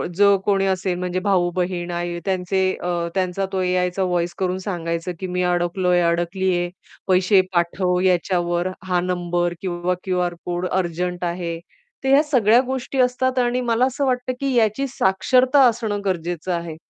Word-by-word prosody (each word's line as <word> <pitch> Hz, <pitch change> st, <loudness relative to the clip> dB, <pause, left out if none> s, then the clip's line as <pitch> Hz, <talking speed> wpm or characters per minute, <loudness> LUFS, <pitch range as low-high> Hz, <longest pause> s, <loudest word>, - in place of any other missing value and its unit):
जो 200 Hz, +1 st, +5 dB
कोणी 195 Hz, -1 st, +2 dB
असेल 185 Hz, -1 st, -1 dB
म्हणजे 180 Hz, 0 st, -2 dB
भाऊ-बहीण 180 Hz, -2 st, 0 dB
आई 175 Hz, 0 st, -3 dB
त्यांचे 190 Hz, 0 st, 0 dB, 0.2 s
अ, 180 Hz, -, -2 dB, 0.3 s
त्यांचा 190 Hz, +1 st, 0 dB
तो 190 Hz, -, 0 dB
एआयचा 180 Hz, +1 st, 0 dB
व्हॉईस 175 Hz, -1 st, -1 dB
करून 185 Hz, -1 st, -1 dB
सांगायचं, 170 Hz, -3 st, -3 dB
की 190 Hz, -, -4 dB
मी 180 Hz, 0 st, -1 dB
अडकलो 180 Hz, +1 st, 0 dB
आहे 175 Hz, 0 st, +4 dB
अडकली 175 Hz, +3 st, 0 dB
आहे. 175 Hz, 0 st, -1 dB, 0.4 s
पैसे 185 Hz, +1 st, +4 dB
पाठव 180 Hz, +1 st, +1 dB
याच्यावर 175 Hz, -1 st, +1 dB, 0.2 s
हा 180 Hz, -1 st, +2 dB
नंबर 175 Hz, -1 st, -1 dB
किंवा 180 Hz, -1 st, -1 dB
क्यूआर 180 Hz, -2 st, -1 dB
कोड 175 Hz, +1 st, -2 dB
अर्जंट 180 Hz, 0 st, -2 dB
आहे, 170 Hz, -1 st, -3 dB, 0.4 s
तर 265 Hz, -, 0 dB
ह्या 275 Hz, +2 st, +6 dB
सगळ्या 240 Hz, -6 st, +4 dB
गोष्टी 260 Hz, +1 st, -4 dB
असतात 255 Hz, +1 st, +1 dB
आणि 245 Hz, 0 st, +1 dB
मला 240 Hz, +1 st, +2 dB
असं 275 Hz, +2 st, -1 dB
वाटतं, 255 Hz, -1 st, -1 dB
की 275 Hz, -1 st, -1 dB
याची 230 Hz, +4 st, +2 dB
साक्षरता 255 Hz, +5 st, +2 dB
असणं 220 Hz, -3 st, -1 dB
गरजेचं 175 Hz, -1 st, -2 dB
आहे. 170 Hz, -2 st, -4 dB
185 Hz, 160 wpm, -21 LUFS, 175-205 Hz, 0.4 s, ह्या